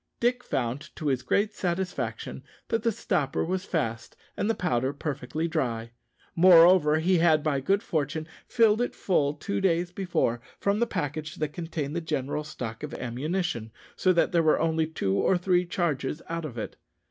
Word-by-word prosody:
Dick 245 +1 +1
found, 125 +3 -2
to 155 -3 -2
his 130 -2 0
great 205 +8 +1
satisfaction, 170 - -3 0.3
that 225 - +1
the 230 +1 +2
stopper 140 -8 -1
was 185 +2 -2
fast 115 - -2 0.2
and 205 - -1
the 225 - +2
powder 130 -6 0
perfectly 150 +2 -3
dry. 120 -8 -2 0.4
Moreover, 170 -3 +7
he 175 +2 +2
had 160 -3 +4
by 145 -3 +1
good 195 +10 +1
fortune 155 -2 -2 0.2
filled 225 -2 +4
it 245 - -1
full 150 -6 +1
two 200 +7 -3
days 175 -2 +1
before 175 -11 -1 0.2
from 200 +1 +1
the 235 - +2
package 150 - -3
that 150 -1 -3
contained 160 -3 -4
the 170 - -1
general 150 -2 -2
stock 125 -7 -6
of 150 - -5
ammunition, 130 - -3 0.2
so 185 - +3
that 170 - +2
there 170 -2 +3
were 155 -1 +3
only 160 0 +1
two 100 -12 -1
or 180 - +3
three 180 0 +1
charges 155 -5 -1
out 165 -1 -3
of 125 -6 -7
it. 110 - -5
160 Hz, 175 wpm, -27 LUFS, 140-180 Hz, 0.4 s, Moreover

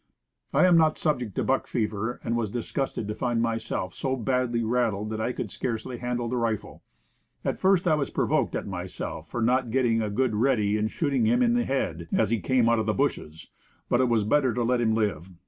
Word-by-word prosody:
I - - +4
am 180 -2 +6
not 155 -1 +3
sub 150 -4 +1
ject 110 -6 -6
to - - 0
buck 135 - 0
fever, 110 0 -2
and 115 - -1
was 115 -3 -1
disgusted 120 0 -3
to 105 - -2
find 120 +1 -1
myself 115 -5 -2
so 130 -1 -2
badly 125 -1 0
"rattled" 110 -3 0
that 110 0 -3
I 120 - 0
could 110 -4 -5
scarcely 120 0 -4
handle 120 -1 -2
the 125 +2 -2
rifle. 115 -3 -2 0.6
At - - -1
first 190 -2 +3
I 160 - +4
was 150 -2 0
provoked - - 0
at - - -3
myself - - -6
for 120 - -2
not 125 +1 +2
get 130 +3 +1
ting 115 -2 +2
a 105 - -1
good 120 +3 0
ready 105 -3 +2
and 110 0 0
shooting 150 - 0
him 245 +2 +3
in 235 -1 +3
the 240 0 +1
head, 85 -11 -2
as 110 -1 +2
he 115 - +2
came 120 +5 +2
out 115 -1 +3
of 110 - -2
the 110 - +1
bushes; 80 - -2 0.4
but 120 - +3
it 130 - +2
was 115 -3 +2
better 130 +1 +2
to 120 - 0
let 120 +1 +1
him 110 -2 +2
live. 95 -6 -1
120 Hz, 230 wpm, -26 LUFS, 110-130 Hz, 0.6 s, am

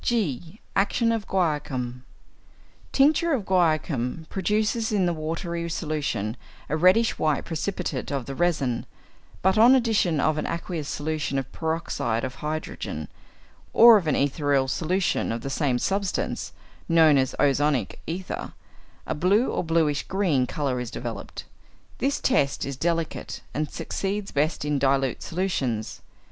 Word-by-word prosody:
(g) 190 - -1 0.2
=Action 230 +4 +2
of 225 -3 -2
Guaiacum.= 135 -8 -1 0.9
Tincture 310 +4 +3
of 245 -7 0
guaiacum 160 -6 +1
produces 215 +4 0
in 200 -4 +2
the 175 - +1
watery 170 +2 -3
solution 145 - -2 0.3
a 150 - +1
reddish 185 +8 +4
white 155 -3 +1
precipitate 165 -4 -3
of 135 -3 -2
the 135 - -5
resin, 140 -7 0 0.6
but 190 +3 +3
on 240 +4 +8
addition 215 - +2
of 155 +2 +2
an - - -2
aqueous 170 -3 -4
solution 150 -2 -2
of 135 - -3
peroxide 160 -8 -2
of 130 - -3
hydrogen, 155 +1 -4 0.6
or 235 0 +9
of 190 -6 +2
an 150 - +2
ethereal 140 -1 +1
solution 175 +4 0
of 115 0 -3
the 135 - -5
same 135 -3 +1
substance 195 +7 -1 0.4
(known 160 -3 +6
as 130 -1 +1
ozonic 140 -5 +2
ether), 180 +3 -5 0.5
a - - -2
blue 195 - +2
or - - -1
bluish 160 -3 +1
green 170 -10 +1
colour 135 -3 -2
is 125 -2 -4
developed. - - -6 0.5
This 275 +3 0
test 175 - +1
is 140 - -4
delicate, 165 +3 -2
and 150 0 -2
succeeds 200 +1 -3
best 150 +1 0
in 145 -1 0
dilute 135 -2 +1
solutions. 135 - -2
160 Hz, 140 wpm, -25 LUFS, 140-190 Hz, 0.9 s, or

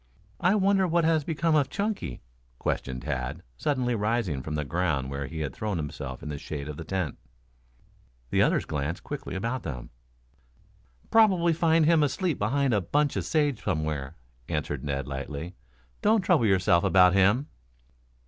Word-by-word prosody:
"I 180 +4 +3
wonder 195 -1 +3
what 170 0 +2
has 160 -2 +3
become 165 +2 0
of 145 -3 +3
Chunky?" 200 - -3 0.3
questioned 65 0 -3
Tad 65 +7 -3
suddenly, 125 - 0
rising 105 - 0
from 75 +3 -4
the 75 -1 -2
ground 75 -4 -1
where 70 0 -3
he 80 +4 -5
had 70 -4 -3
thrown 105 -4 -3
himself 70 -3 -5
in 75 - -5
the 75 -1 -4
shade 70 -1 -6
of 75 -1 -6
the 80 - -6
tent. 85 -2 -3 1.1
The - - +3
others - - +2
glanced 75 +3 -3
quickly - - -6
about 115 +6 -2
them. 65 -7 -6 1.2
"Probably 185 -7 +5
find 165 -1 +3
him 165 0 +5
asleep 155 +3 0
behind 130 +5 +1
a 105 - +2
bunch 145 - +1
of - - -2
sage 145 -6 +1
somewhere," 75 -5 -2 0.3
answered 75 -4 -2
Ned 70 -2 -2
lightly. 70 +5 -5 0.5
"Don't 215 0 +4
trouble 170 -11 +3
yourself 95 -3 +3
about 90 -1 +5
him." 100 +9 +3
95 Hz, 160 wpm, -27 LUFS, -, 1.2 s, Probably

